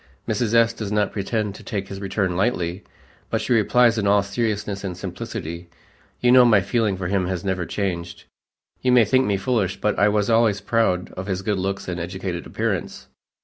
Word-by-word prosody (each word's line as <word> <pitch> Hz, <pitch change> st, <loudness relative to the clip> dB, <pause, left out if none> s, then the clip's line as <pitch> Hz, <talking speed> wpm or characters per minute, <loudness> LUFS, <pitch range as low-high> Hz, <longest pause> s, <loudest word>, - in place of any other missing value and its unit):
Mrs. 110 Hz, +1 st, 0 dB
S. 115 Hz, 0 st, +4 dB
does 110 Hz, -3 st, -5 dB
not 105 Hz, -1 st, +1 dB
pretend 105 Hz, 0 st, -2 dB
to -, -, -12 dB
take 100 Hz, -4 st, -4 dB
his 100 Hz, 0 st, -7 dB
return 95 Hz, -2 st, -1 dB
lightly, 90 Hz, -2 st, -1 dB, 0.5 s
but 115 Hz, -, 0 dB
she 115 Hz, +3 st, 0 dB
replies 115 Hz, +1 st, +4 dB
in 100 Hz, -, 0 dB
all 100 Hz, 0 st, +4 dB
seriousness 105 Hz, -1 st, -2 dB
and 90 Hz, -3 st, -4 dB
simplicity, 85 Hz, -1 st, -6 dB, 0.5 s
"You 125 Hz, -, +4 dB
know 125 Hz, 0 st, +8 dB
my 115 Hz, -4 st, +5 dB
feeling 100 Hz, 0 st, 0 dB
for 95 Hz, -, -5 dB
him 90 Hz, 0 st, 0 dB
has 90 Hz, 0 st, -3 dB
never 95 Hz, -3 st, -1 dB
changed. 85 Hz, -2 st, -3 dB, 0.6 s
You 125 Hz, -1 st, +2 dB
may 120 Hz, -3 st, +6 dB
think 130 Hz, +5 st, +2 dB
me 100 Hz, -1 st, +1 dB
foolish, 95 Hz, -3 st, -1 dB
but 105 Hz, -1 st, 0 dB
I 105 Hz, -, +5 dB
was 105 Hz, -1 st, +1 dB
always 115 Hz, -3 st, +3 dB
proud 100 Hz, -4 st, 0 dB
of 90 Hz, +2 st, -7 dB
his 95 Hz, -1 st, -2 dB
good 105 Hz, -1 st, 0 dB
looks 95 Hz, +1 st, -3 dB
and 90 Hz, -1 st, -3 dB
educated 90 Hz, 0 st, -5 dB
appearance. -, -, -3 dB
100 Hz, 195 wpm, -22 LUFS, 95-110 Hz, 0.6 s, know